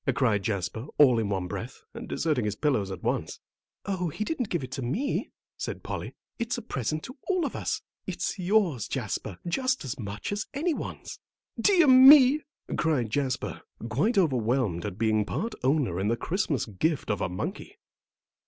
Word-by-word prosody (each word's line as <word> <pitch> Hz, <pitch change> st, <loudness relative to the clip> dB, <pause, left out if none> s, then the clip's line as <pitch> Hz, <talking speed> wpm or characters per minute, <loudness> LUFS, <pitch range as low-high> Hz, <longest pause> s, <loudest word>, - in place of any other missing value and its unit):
cried 115 Hz, -7 st, +2 dB
Jasper, 100 Hz, +4 st, -3 dB
all 130 Hz, -6 st, +6 dB
in 110 Hz, -3 st, -1 dB
one 95 Hz, -2 st, -1 dB
breath, 115 Hz, +7 st, -6 dB
and -, -, -8 dB
deserting 150 Hz, -7 st, 0 dB
his 105 Hz, -1 st, -1 dB
pillows 125 Hz, -10 st, +1 dB
at 95 Hz, -, -7 dB
once. -, -, -2 dB, 0.5 s
"Oh, 185 Hz, -3 st, -1 dB
he 215 Hz, -, -3 dB
didn't 250 Hz, -3 st, -2 dB
give 170 Hz, -6 st, -1 dB
it 130 Hz, -, -7 dB
to 135 Hz, -, -4 dB
me," 185 Hz, -, -1 dB, 0.3 s
said -, -, -5 dB
Polly. -, -, -5 dB, 0.2 s
"It's 235 Hz, +1 st, -1 dB
a 240 Hz, -, -6 dB
present 155 Hz, -, -3 dB
to 255 Hz, +2 st, -10 dB
all 370 Hz, -4 st, +1 dB
of -, -, -4 dB
us; -, -, -2 dB, 0.2 s
it's -, -, -3 dB
yours, 180 Hz, -, +2 dB
Jasper, -, -, -3 dB
just 255 Hz, -, 0 dB
as 130 Hz, -, -5 dB
much 105 Hz, -, -5 dB
as 205 Hz, +1 st, -2 dB
any 325 Hz, +4 st, +1 dB
one's." -, -, -6 dB, 0.4 s
"Dear 375 Hz, -5 st, +5 dB
me!" 265 Hz, +2 st, +9 dB, 0.3 s
cried 140 Hz, -9 st, 0 dB
Jasper, 135 Hz, -1 st, -2 dB, 0.3 s
quite 165 Hz, -, +1 dB
overwhelmed 125 Hz, -, +1 dB
at 100 Hz, -2 st, -6 dB
being 110 Hz, -1 st, +2 dB
part 220 Hz, -, -3 dB
owner 130 Hz, -, +1 dB
in 95 Hz, -, 0 dB
the 115 Hz, +2 st, +1 dB
Christmas 160 Hz, -, -1 dB
gift 125 Hz, -, -1 dB
of 105 Hz, -, -2 dB
a 90 Hz, -, 0 dB
monkey. 175 Hz, -, -5 dB
145 Hz, 175 wpm, -27 LUFS, -, 0.5 s, me